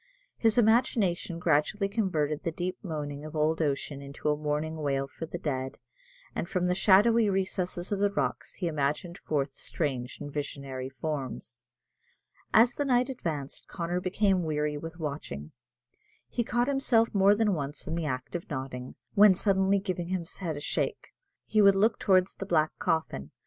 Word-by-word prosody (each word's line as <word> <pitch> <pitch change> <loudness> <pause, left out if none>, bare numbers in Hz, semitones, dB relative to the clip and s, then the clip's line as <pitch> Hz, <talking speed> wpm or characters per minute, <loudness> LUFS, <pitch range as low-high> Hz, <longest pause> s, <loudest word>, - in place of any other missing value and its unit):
His 225 -1 +2
imagination 220 -7 +2
gradually 170 +5 +2
converted 165 -8 0
the - - -1
deep 180 +3 -3
moaning 150 -5 -5
of 155 +1 -8
old 155 +1 +1
ocean 140 -1 -1
into 140 +2 -4
a 150 - +3
mournful 155 +1 -2
wail 135 -2 0
for 165 +4 -7
the 175 - -5
dead, 130 -5 -3 0.6
and 170 - -3
from 180 -1 0
the 180 - +2
shadowy 210 +4 +5
recesses 185 -2 -1
of 200 - 0
the 205 0 +3
rocks 200 - -2
he 180 - -2
imaged 155 +4 -1
forth 140 -2 -1
strange 135 -5 -3
and 145 - -7
visionary 140 -3 -4
forms. 130 - -5 0.9
As 235 +3 +6
the 290 - -1
night 250 -1 +3
advanced, 155 - -4
Connor 175 +1 -2
became 190 0 +2
weary 150 -2 -1
with 165 +2 -7
watching. 140 - -5 0.8
He 240 - -1
caught 240 +1 +1
himself 255 -5 +2
more 200 0 +5
than 210 -1 +2
once 145 -2 -4
in - - -3
the 165 -1 -1
act 130 +4 -4
of 175 - -5
nodding, 130 -3 -5 0.2
when 205 -2 +7
suddenly 195 0 +3
giving 185 -3 -3
his 180 -1 -3
head 165 -6 -3
a - - -6
shake, - - -2 0.4
he 215 - +3
would 200 -1 +7
look 215 +4 +3
towards 185 -1 +3
the 195 - -7
black 155 -4 +3
coffin. 155 - -1
170 Hz, 170 wpm, -29 LUFS, 145-195 Hz, 0.9 s, when